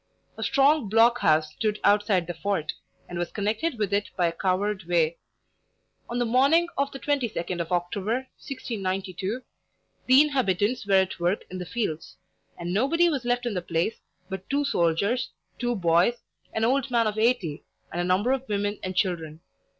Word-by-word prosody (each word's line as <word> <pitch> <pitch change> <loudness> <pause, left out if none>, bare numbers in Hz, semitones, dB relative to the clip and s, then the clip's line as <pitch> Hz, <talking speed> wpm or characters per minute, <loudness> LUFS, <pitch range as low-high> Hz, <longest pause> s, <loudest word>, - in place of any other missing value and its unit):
A - - -8
strong 275 0 +3
block 230 +3 +5
house 155 -1 +3
stood 215 +2 -1
outside 205 -3 +3
the 175 - -4
fort, 165 -2 -2 0.3
and 175 -1 -5
was 175 - -2
connected 220 +8 -1
with 205 -2 -1
it 205 0 +1
by 180 - +3
a 170 - +2
covered 190 +2 -1
way. 170 -1 +1 0.9
On 240 - -2
the 245 - +1
morning 280 +9 +4
of 280 0 0
the - - -7
twenty 280 -3 0
second 175 -4 -3
of 170 - -6
October, 200 +8 -1 0.2
(1692) 195 - -4 0.6
the 260 +2 +8
inhabitants 240 -5 0
were 195 - +4
at 190 -1 +2
work 175 +4 0
in 185 - -5
the 180 - -6
fields, 190 -9 -3 0.4
and 175 0 -4
nobody 330 - +3
was 275 -6 -2
left 245 0 0
in 240 - -1
the 180 - -2
place 170 +5 -1 0.3
but 190 0 -7
two 285 +1 +1
soldiers, 200 +3 +1 0.3
two 240 -1 0
boys, 175 +4 +3 0.4
an 220 - 0
old 265 +2 +1
man 235 -2 +2
of 215 0 -1
eighty, 205 -10 +1 0.3
and 175 - -2
a - - 0
number 185 +7 +2
of 265 -1 -2
women 205 0 -1
and 185 0 -4
children. 165 -4 -1
205 Hz, 180 wpm, -26 LUFS, 180-245 Hz, 0.9 s, the